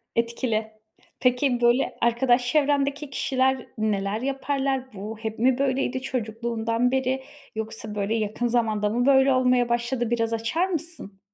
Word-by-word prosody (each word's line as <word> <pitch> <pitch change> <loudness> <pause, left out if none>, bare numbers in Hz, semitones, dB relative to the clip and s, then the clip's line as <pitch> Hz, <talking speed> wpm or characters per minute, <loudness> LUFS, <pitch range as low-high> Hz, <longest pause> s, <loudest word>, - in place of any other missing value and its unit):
Etkili. 230 -2 -1 0.5
Peki, 250 0 +2
böyle 240 +3 +2
arkadaş 240 +1 +3
çevrendeki 285 -1 +1
kişiler 265 -1 0
neler 210 0 -1
yaparlar? 270 -1 -1
Bu, 210 +3 -6
hep 220 0 -5
mi 250 +2 +3
böyleydi 265 -1 0
çocukluğundan 230 -1 -1
beri, 265 0 0 0.3
yoksa 220 -1 -5
böyle 205 +2 -1
yakın 220 +2 -1
zamanda 220 -3 +1
mı 240 +3 0
böyle 270 0 +5
olmaya 250 -1 +3
başladı, 240 0 0
biraz 230 -1 0
açar 235 +11 0
mısın? 325 - -4
245 Hz, 130 wpm, -25 LUFS, 225-265 Hz, 0.5 s, böyle